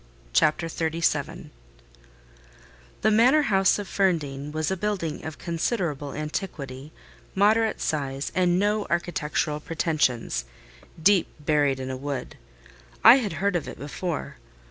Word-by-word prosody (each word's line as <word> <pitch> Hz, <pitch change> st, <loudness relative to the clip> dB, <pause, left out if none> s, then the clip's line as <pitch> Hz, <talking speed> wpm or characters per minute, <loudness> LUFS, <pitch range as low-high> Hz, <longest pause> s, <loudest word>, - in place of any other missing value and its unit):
CHAPTER 150 Hz, -, +3 dB
XXXVII 165 Hz, 0 st, -2 dB, 1.5 s
The 215 Hz, -, +4 dB
manor 250 Hz, +8 st, +5 dB
house 195 Hz, -7 st, +3 dB
of 205 Hz, -2 st, -5 dB
Ferndean 150 Hz, -8 st, -1 dB
was 155 Hz, +2 st, -1 dB
a -, -, +1 dB
building 190 Hz, -5 st, -3 dB
of 155 Hz, -1 st, -6 dB
considerable 165 Hz, -, -2 dB
antiquity, 150 Hz, -3 st, -5 dB, 0.4 s
moderate 215 Hz, +3 st, +3 dB
size, 140 Hz, -2 st, -2 dB
and 180 Hz, -1 st, +2 dB
no 210 Hz, +2 st, +1 dB
architectural 155 Hz, -3 st, -1 dB
pretensions, 150 Hz, -, -1 dB, 0.5 s
deep 190 Hz, +2 st, +4 dB
buried 145 Hz, -3 st, +1 dB
in 130 Hz, 0 st, -4 dB
a 130 Hz, -, -4 dB
wood. 140 Hz, -1 st, -5 dB, 0.7 s
I 250 Hz, -, +10 dB
had 220 Hz, -9 st, -2 dB
heard 200 Hz, +3 st, 0 dB
of 170 Hz, -, -1 dB
it -, -, -8 dB
before. 155 Hz, -, -5 dB
165 Hz, 120 wpm, -25 LUFS, 145-195 Hz, 1.5 s, I